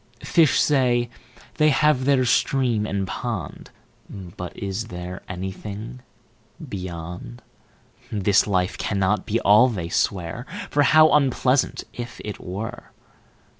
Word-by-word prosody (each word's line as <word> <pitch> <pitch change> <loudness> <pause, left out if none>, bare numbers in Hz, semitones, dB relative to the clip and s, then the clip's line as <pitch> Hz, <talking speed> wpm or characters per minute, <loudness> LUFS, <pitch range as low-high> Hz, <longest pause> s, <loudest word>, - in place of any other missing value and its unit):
5Fish 160 -4 +3
say, 120 -4 +2 0.5
they 155 -1 +5
have 150 -2 +3
their 135 -2 +3
Stream 120 -3 +1
and 100 -1 -1
Pond;6But 90 0 -7
is 100 +3 -3
there 90 -3 -7
anything 100 +6 -6 0.7
Beyond?7This 90 - -4
life 90 -1 0
cannot 100 +1 0
be 115 +2 +1
All, 105 +5 +6
they 90 -8 -4
swear,8For 100 - -1
how 155 +1 +6
unpleasant, 135 -2 +2
if 120 -1 -7
it 105 - -6
were! 100 +5 -6
105 Hz, 100 wpm, -23 LUFS, 95-125 Hz, 0.7 s, All